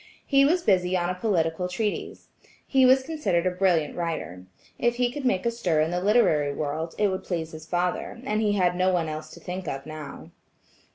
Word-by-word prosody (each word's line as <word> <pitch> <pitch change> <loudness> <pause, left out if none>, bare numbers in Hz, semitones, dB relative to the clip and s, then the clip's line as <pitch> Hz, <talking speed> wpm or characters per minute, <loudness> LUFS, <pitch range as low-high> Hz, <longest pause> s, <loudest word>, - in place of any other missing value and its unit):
He 275 -1 +4
was 340 +4 +2
busy 185 -2 +2
on 175 0 0
a - - -1
political 180 -3 0
treatise. 210 +3 -3 0.4
He 265 -2 +4
was 260 +1 +5
considered 210 - -1
a 185 - +2
brilliant 180 -5 +1
writer. 155 - -4 0.3
If 240 0 +2
he 245 0 +1
could 280 +1 -6
make 190 -6 +1
a 235 - +2
stir 180 -9 0
in 155 +2 +1
the 180 0 -1
literary 180 -9 +3
world, 155 +3 -3
it 210 -1 +2
would 190 0 -3
please 165 -3 -3
his 155 0 -10
father, 180 +6 -2
and 215 -4 -1
he 210 -2 +2
had 180 -3 +2
no 185 +1 +2
one 175 -3 0
else 155 0 -6
to - - -12
think 180 +1 -6
of 135 0 -4
now. 155 -2 -9
180 Hz, 210 wpm, -26 LUFS, 160-215 Hz, 0.4 s, was